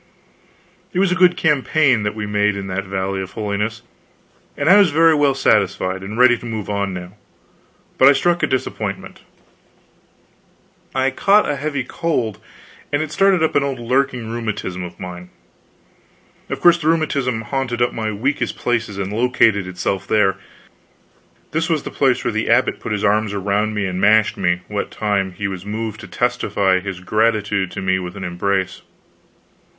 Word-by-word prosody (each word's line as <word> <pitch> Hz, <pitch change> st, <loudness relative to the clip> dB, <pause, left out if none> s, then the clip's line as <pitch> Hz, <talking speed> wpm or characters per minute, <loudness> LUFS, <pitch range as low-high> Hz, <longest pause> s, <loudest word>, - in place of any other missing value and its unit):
It -, -, -4 dB
was 190 Hz, -1 st, +3 dB
a 185 Hz, 0 st, -1 dB
good 180 Hz, 0 st, +5 dB
campaign 150 Hz, -5 st, +2 dB
that 105 Hz, 0 st, -2 dB
we 105 Hz, -1 st, -4 dB
made 105 Hz, 0 st, +1 dB
in 100 Hz, -1 st, -5 dB
that 95 Hz, +1 st, -3 dB
Valley 95 Hz, 0 st, -2 dB
of 95 Hz, +1 st, -8 dB
Holiness, 105 Hz, +2 st, -3 dB, 0.7 s
and -, -, -1 dB
I 190 Hz, +4 st, +8 dB
was 200 Hz, -4 st, +5 dB
very 165 Hz, +2 st, +4 dB
well 145 Hz, -3 st, +2 dB
satisfied, 95 Hz, -6 st, +1 dB
and 105 Hz, +3 st, -7 dB
ready 125 Hz, -1 st, +5 dB
to -, -, -11 dB
move 110 Hz, -3 st, -4 dB
on 100 Hz, -1 st, -1 dB
now, 90 Hz, 0 st, -7 dB, 0.9 s
but 130 Hz, -, +7 dB
I 140 Hz, -, +8 dB
struck 175 Hz, +5 st, +1 dB
a -, -, +2 dB
disappointment. 130 Hz, -1 st, -4 dB, 1.7 s
I 130 Hz, 0 st, +2 dB
caught 200 Hz, +9 st, +3 dB
a 145 Hz, -, 0 dB
heavy 140 Hz, -1 st, -2 dB
cold, 125 Hz, -, -2 dB, 0.5 s
and 145 Hz, +2 st, +1 dB
it 155 Hz, -, -7 dB
started 195 Hz, -1 st, +3 dB
up 160 Hz, -, +1 dB
an 145 Hz, -, +4 dB
old 140 Hz, -1 st, -2 dB
lurking 125 Hz, -1 st, -1 dB
rheumatism 110 Hz, -6 st, -4 dB
of 90 Hz, -1 st, -8 dB
mine. 90 Hz, -1 st, -8 dB, 1.2 s
Of -, -, -4 dB
course 175 Hz, 0 st, +6 dB
the 155 Hz, -, -3 dB
rheumatism 140 Hz, -7 st, 0 dB
hunted 125 Hz, 0 st, -3 dB
up 120 Hz, -, 0 dB
my 110 Hz, -1 st, -2 dB
weakest 130 Hz, +8 st, -2 dB
place 115 Hz, -2 st, -1 dB
and 100 Hz, 0 st, -4 dB
located 110 Hz, -4 st, +2 dB
itself 95 Hz, +1 st, -3 dB
there. 95 Hz, -3 st, +2 dB, 1.1 s
This 160 Hz, +2 st, -1 dB
was 160 Hz, -3 st, 0 dB
the -, -, -6 dB
place 130 Hz, -3 st, +1 dB
where -, -, 0 dB
the 110 Hz, +1 st, -1 dB
abbot 120 Hz, +3 st, +2 dB
put -, -, -6 dB
his 105 Hz, -1 st, -2 dB
arms 105 Hz, 0 st, +1 dB
about 100 Hz, +2 st, 0 dB
me 105 Hz, -2 st, -2 dB
and 90 Hz, 0 st, -3 dB
mashed 110 Hz, +1 st, +4 dB
me, 90 Hz, -2 st, 0 dB
what 105 Hz, -1 st, -3 dB
time 100 Hz, -3 st, -1 dB
he 100 Hz, +3 st, -3 dB
was 95 Hz, -2 st, -6 dB
moved 110 Hz, +1 st, -4 dB
to -, -, -10 dB
testify 95 Hz, -2 st, 0 dB
his 95 Hz, -1 st, -6 dB
gratitude 105 Hz, -1 st, +1 dB
to -, -, -5 dB
me 95 Hz, 0 st, +1 dB
with 90 Hz, +1 st, -7 dB
an 95 Hz, -, -6 dB
embrace. 95 Hz, +1 st, -2 dB
110 Hz, 175 wpm, -19 LUFS, 100-135 Hz, 1.7 s, I